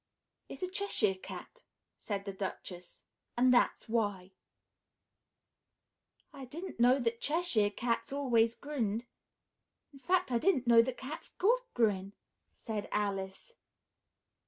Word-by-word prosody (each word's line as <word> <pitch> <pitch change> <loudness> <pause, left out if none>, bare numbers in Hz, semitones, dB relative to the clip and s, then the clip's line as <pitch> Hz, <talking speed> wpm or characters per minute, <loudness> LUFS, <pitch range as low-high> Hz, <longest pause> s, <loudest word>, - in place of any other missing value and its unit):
"It's - - -7
a - - 0
Cheshire 370 - +1
Cat," 330 - -10 0.3
said 200 -2 -4
the 195 - -4
Duchess, 185 -2 -7 0.3
"and 250 +1 +5
that's 245 - +2
why." 205 -5 -1 2.0
"I 275 - -9
didn't 325 +4 -8
know 250 +2 +6
that 230 -3 -1
Cheshire 295 -10 +2
Cats 230 +5 -2
always 235 -5 +2
grinned; 240 -6 -2 0.9
in 275 - -13
fact, 360 +2 +1
I 235 - +2
didn't 275 -5 +2
know 235 -1 +7
that 245 +1 -3
cats 265 +3 -7
could 475 +6 +3
grin," 200 -4 +1 0.4
said 215 -3 -5
Alice. 200 - -2
235 Hz, 120 wpm, -32 LUFS, 205-280 Hz, 2.0 s, know